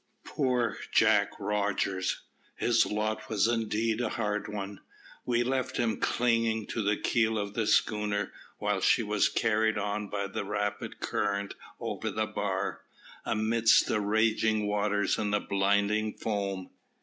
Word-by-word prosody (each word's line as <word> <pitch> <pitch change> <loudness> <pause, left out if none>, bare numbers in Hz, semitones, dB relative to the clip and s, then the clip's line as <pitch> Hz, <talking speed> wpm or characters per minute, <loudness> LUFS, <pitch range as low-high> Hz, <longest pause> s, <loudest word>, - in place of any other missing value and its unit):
Poor 125 -6 0
Jack - - +4
Rogers! 100 -2 -1 0.3
His 120 -1 +3
lot 110 +1 -2
was 110 0 +2
indeed 115 0 0
a 115 - 0
hard 105 -2 -2
one. 100 -1 -5 0.5
We 120 -1 +2
left 130 +1 -1
him 115 -3 0
clinging 115 -2 +1
to 115 - -2
the 105 0 +1
keel 110 -1 +1
of 100 -1 -3
the 110 -1 -1
schooner, 105 -2 +1 0.2
while - - -1
she - - +4
was - - +2
carried 110 0 +1
on 105 +1 -2
by 100 -1 -2
the 100 - -4
rapid 105 0 -3
current 100 -1 -1 0.3
over - - -3
the - - -1
bar, - - -2 0.4
amidst 110 +1 +3
the 105 - 0
raging 110 +1 +2
waters 105 0 +1
and 105 -1 0
blinding 100 +2 +1
foam. 100 -3 -3
105 Hz, 135 wpm, -29 LUFS, 100-110 Hz, 0.5 s, Jack